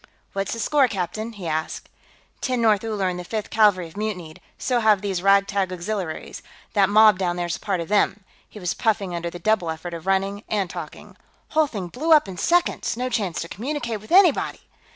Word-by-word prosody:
"What's 195 0 -2
the 230 - -5
score, 280 +3 +3
captain?" 215 +2 -4
he 200 -4 -9
asked. 160 -1 -3 0.5
"Tenth 255 -2 -1
North 220 -3 +3
Uller 210 -4 -1
and 180 -1 -2
the - - -5
Fifth 215 +3 -4
Cavalry 205 -5 +4
have 165 - -13
mutinied; 185 -7 -5 0.2
so 250 -2 0
have 215 -3 +4
these 190 -3 -2
rag 195 +1 +5
tag 195 -2 -1
Auxiliaries. 180 -2 -4 0.3
That 200 -3 +4
mob 215 -2 +6
down 175 -2 0
there's 175 -1 -3
part 195 -3 -2
of 165 - -4
them." 205 0 +1 0.3
He 210 - -11
was 180 -3 -1
puffing 205 -6 0
under 170 0 -3
the 175 - -8
double 215 -3 +1
effort 160 +2 -5
of 170 +2 -8
running 195 +2 0
and 200 -4 -1
talking. - - -9 0.3
"Whole 310 -1 +3
thing 200 -9 -5
blew 315 - +2
up 300 -8 +5
in 185 -2 -7
seconds; 345 - +1
no 255 +1 -2
chance 200 -8 -1
to 165 - -5
communicate 235 - -4
with 215 - -15
anybody...." 355 -4 +4
200 Hz, 205 wpm, -23 LUFS, 180-220 Hz, 0.5 s, mob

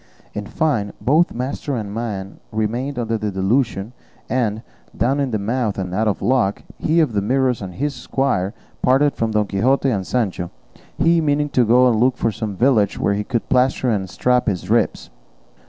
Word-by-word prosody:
In 105 -1 -5
fine, 130 -11 0
both 155 +7 +3
master 130 +3 -3
and 105 -4 -4
man 105 -4 -5
remained 120 +6 -2
under 115 -2 -1
the 105 - -2
delusion; 105 +2 0 0.4
and, 115 -3 0 0.3
down 135 +4 +1
in 140 -2 0
the 110 - 0
mouth, 110 +1 -1
and 90 -2 -3
out 110 +3 +1
of 105 - -1
luck, 120 -6 +1 0.2
he 160 +2 +2
of 150 -8 +2
the 100 - +1
Mirrors 125 +2 +1
and 90 -3 -7
his 145 +1 -1
squire 125 -6 -1 0.3
parted 140 +3 +3
from 115 - -1
Don 105 -1 +1
Quixote 130 +7 +1
and 95 -5 -2
Sancho, 100 -8 -1 0.5
he 170 0 +3
meaning 145 -1 +1
to 125 -3 +3
go 125 +3 +5
look 125 +3 +2
for 115 - +1
some 105 -2 -4
village 110 -3 +2
where 100 - +1
he 105 +1 -1
could 120 0 -2
plaster 130 -1 +2
and 95 -3 -1
strap 125 +7 +1
his 95 -4 -2
ribs. - - +1
115 Hz, 185 wpm, -20 LUFS, 105-130 Hz, 0.5 s, go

